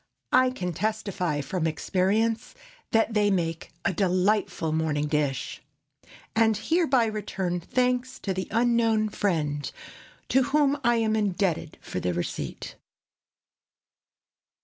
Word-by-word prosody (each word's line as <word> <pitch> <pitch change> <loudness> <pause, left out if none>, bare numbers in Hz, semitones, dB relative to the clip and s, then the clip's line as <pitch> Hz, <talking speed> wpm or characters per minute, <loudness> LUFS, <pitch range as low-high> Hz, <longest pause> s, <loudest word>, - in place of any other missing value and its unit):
I 255 0 +6
can 180 -9 -4
testify, 200 -5 -1
from 165 +3 -1
experience, 210 +8 0 0.3
that 225 0 +2
they 210 -1 +3
make 165 -4 -1
a 190 - +2
delightful 185 -2 +1
morning 155 -2 0
dish, 145 -3 -1 0.7
and 220 -1 +4
hereby 270 -1 +2
return 195 -4 -2
thanks 250 +6 0
to 195 - -1
the 185 0 -3
unknown 230 -2 +2
friend 155 -9 -1 0.6
to 265 - +4
whom 285 0 +2
I 240 0 +4
am 220 -1 +1
indebted 190 -6 0
for - - -4
the 90 -1 -1
receipt. 90 - -4
205 Hz, 115 wpm, -26 LUFS, 165-230 Hz, 0.7 s, I